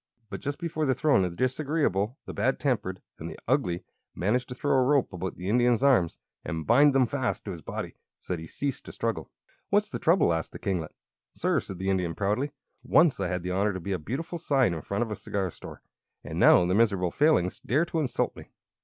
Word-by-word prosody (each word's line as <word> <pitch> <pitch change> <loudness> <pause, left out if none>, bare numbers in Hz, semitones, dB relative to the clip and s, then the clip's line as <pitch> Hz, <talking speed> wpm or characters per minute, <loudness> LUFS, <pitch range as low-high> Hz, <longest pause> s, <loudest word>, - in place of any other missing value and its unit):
But - - -4
just 145 0 -4
before 160 -3 -2
the 130 - +2
throne 145 -10 +3
the 90 - +1
Disagreeable, 130 - 0
the - - -7
Bad 130 - 0
Tempered, 105 -10 -1 0.2
and - - -5
the - - -9
Ugly 85 0 +1 0.3
managed 120 +7 0
to 125 - -6
throw 145 +3 -1
a 130 -1 +4
rope 135 -4 +2
about 90 +1 -4
the 90 - -7
Indian's 120 +2 +3
arms 120 -12 +3 0.3
and 80 0 -4
bind 140 +3 +5
them 130 -1 +5
fast 130 0 -2
to 100 - -4
his 85 -3 -7
body, - - -5 0.3
so - - -4
that 85 - -3
he 80 - -8
ceased 140 - -4
to - - -8
struggle. - - -3 0.4
"What's - - +2
the - - -3
trouble?" 85 - +4
asked 80 -1 -3
the - - -6
kinglet. 90 -5 -3 0.4
"Sir," - - +1
said 95 - -8
the 95 +2 -1
Indian, 90 -4 -1
proudly; 105 +8 0 0.3
"once 160 -7 +4
I 95 - 0
had 90 0 -2
the 90 - -3
honor 100 +2 +1
to 95 - -4
be 100 +3 -5
a 95 - -1
beautiful 160 - -4
sign 135 - +2
in 80 - -4
front 100 +9 -1
of 115 - -6
a - - -2
cigar 95 -4 -3
store, - - -11 0.4
and - - -5
now 90 - +7
these 90 - +1
miserable 100 -6 +2
Failings 145 - +2
dare 145 +8 +1
to 170 -1 -2
insult 140 -5 -1
me." - - -11
105 Hz, 225 wpm, -27 LUFS, 90-140 Hz, 0.4 s, now